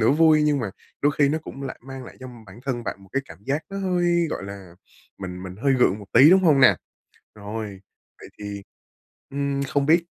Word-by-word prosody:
nửa 110 - +4
vui 155 +1 +5
nhưng 150 -1 +2
mà 115 -6 -3 0.3
đôi 145 +1 +4
khi 140 -2 +5
nó 155 - 0
cũng 140 -3 -9
lại 135 - -6
mang 135 -1 -7
lại - - -12
cho 130 - -8 0.2
bản 100 +4 -13
thân 125 -3 -3
bạn 100 -1 -5
một 95 - -17
cái 135 - 0
cảm 80 - -13
giác 145 +5 -1
nó 195 - -4
hơi, 175 -3 +1
gọi - - -4
là, 100 -3 -9 0.4
mình 90 -1 -6
mình 95 -1 -8
hơi 140 - +4
gượng 125 -6 +3
một 100 - -11
tí, 135 +7 +8
đúng 190 +1 +7
hông 155 -6 +5
nè? 130 - +7 0.6
Rồi, 105 -1 -6 0.4
vậy - - -11
thì, 100 -1 -6 0.7
ừm, 140 0 -1
không 140 0 0
biết 165 +3 +4
135 Hz, 225 wpm, -24 LUFS, 105-150 Hz, 0.7 s, tí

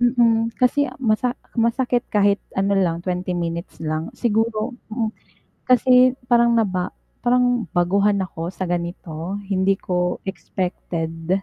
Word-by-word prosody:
Mm, 235 -2 +3
kasi 275 +3 +2
masa 245 0 0 0.2
masakit 240 +1 +1
kahit 200 -1 +3 0.2
ano 195 +1 +2
lang, 175 -4 +1
20 180 0 -2
minutes 170 0 -4
lang. 155 +1 -2
Siguro 225 0 0 0.2
mm, 220 -1 -1 0.6
kasi 255 0 +6 0.2
parang 235 0 +5
naba 190 -6 0 0.3
parang 245 -2 +3
baguhan 200 +3 +2
ako 170 0 -5
sa 185 -2 -4
ganito 170 0 -4 0.2
hindi 195 0 +3
ko 180 -1 -2
expected. 180 -2 -3
200 Hz, 120 wpm, -22 LUFS, 180-235 Hz, 0.6 s, kasi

